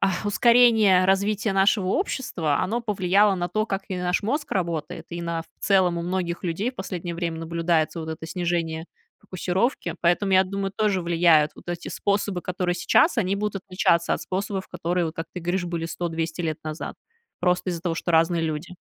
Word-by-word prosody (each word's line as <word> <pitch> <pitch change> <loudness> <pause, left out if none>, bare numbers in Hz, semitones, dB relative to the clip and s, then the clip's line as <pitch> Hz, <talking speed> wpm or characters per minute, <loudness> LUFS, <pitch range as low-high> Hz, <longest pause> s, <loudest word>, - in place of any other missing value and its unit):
а, 195 -1 +2
ускорение 220 -3 +5
развития 200 +2 +1
нашего 195 0 +3
общества, 185 - -1
оно 230 +5 -1
повлияло 200 -2 +3
на 175 -1 -2
то, 215 +2 -1
как 195 -2 -2
и 185 - -3
наш 180 +1 0
мозг 285 +8 -2
работает 170 -5 -3
и 170 0 -5
на, 170 -1 -2
в - - -25
целом, 185 -4 +3
у - - -3
многих 175 0 -2
людей 185 +7 -1
в 255 - -24
последнее 180 -2 -5
время 170 -1 -3
наблюдается 165 0 0
вот 160 - -6
это 160 0 -6
снижение 165 -2 -2 0.3
фокусировки. 185 +7 -1
Поэтому 180 +3 +2
я 190 0 +6
думаю, 195 +1 -3
тоже 210 -4 +1
влияют 165 -3 +4
вот - - -15
эти 175 -1 -4
способы, 200 -2 -1
которые 180 -1 -1
сейчас, 310 - +3
они 195 -3 +1
будут 200 -1 -3
отличаться 170 -2 +2
от - - -5
способов, 190 0 -3
которые, 175 +1 -1
вот 160 - -6
как 165 - -4
ты 180 - -4
говоришь, 175 +2 -1
были 170 -1 -3
100-200 165 0 -3
лет 155 -2 -2
назад, 155 0 -5 0.5
просто 180 +1 +1
из-за 170 -2 -4
того, 170 -2 -1
что 175 - -2
разные 165 +1 +3
люди. 160 +3 -4
180 Hz, 185 wpm, -24 LUFS, 170-195 Hz, 0.5 s, я